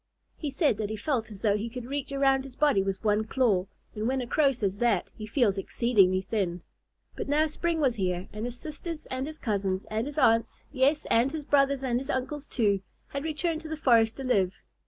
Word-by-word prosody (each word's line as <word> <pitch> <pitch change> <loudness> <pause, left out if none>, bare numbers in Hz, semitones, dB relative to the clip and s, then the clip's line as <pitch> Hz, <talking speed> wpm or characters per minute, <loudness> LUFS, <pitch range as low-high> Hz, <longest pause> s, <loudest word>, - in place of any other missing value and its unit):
He 300 - -4
said 280 - +1
that 210 -2 -2
he 220 - -3
felt 230 0 -1
as 205 -1 -11
though 205 -2 +3
he 215 +3 -3
could 245 0 -7
reach 280 +2 -4
around 270 -1 +3
his 265 -2 -11
body 290 -10 +3
with 195 +1 -3
one 210 0 +2
claw, 215 -5 +1 0.3
and 215 +1 -2
when 265 +1 +1
a 250 - -2
Crow 280 +3 +3
says 200 -6 -2
that 230 -7 +1
he 215 - -7
feels 210 -5 +2
exceedingly 195 -4 +3
thin. 185 -4 -2 0.5
But - - -5
now 300 +2 +3
spring 330 +2 -1
was 270 -5 +3
here, 185 -4 -2
and 215 +2 -4
his 245 0 -4
sisters 310 +3 -6
and 260 +2 -2
his 310 0 -7
cousins 195 -6 -1
and 220 +4 -1
his 290 - -6
aunts, 230 -5 +2
yes, 285 +2 +2
and 240 +4 +4
his 310 -1 -4
brothers 275 -1 +2
and 245 -2 +1
his 270 +2 -6
uncles, 280 +2 -3
too, 205 -5 +1 0.3
had 280 0 -4
returned 320 +1 -2
to 315 - -8
the 315 - -3
forest 230 -6 +4
to 270 - -5
live. 195 -8 +1
245 Hz, 220 wpm, -28 LUFS, 210-280 Hz, 0.5 s, and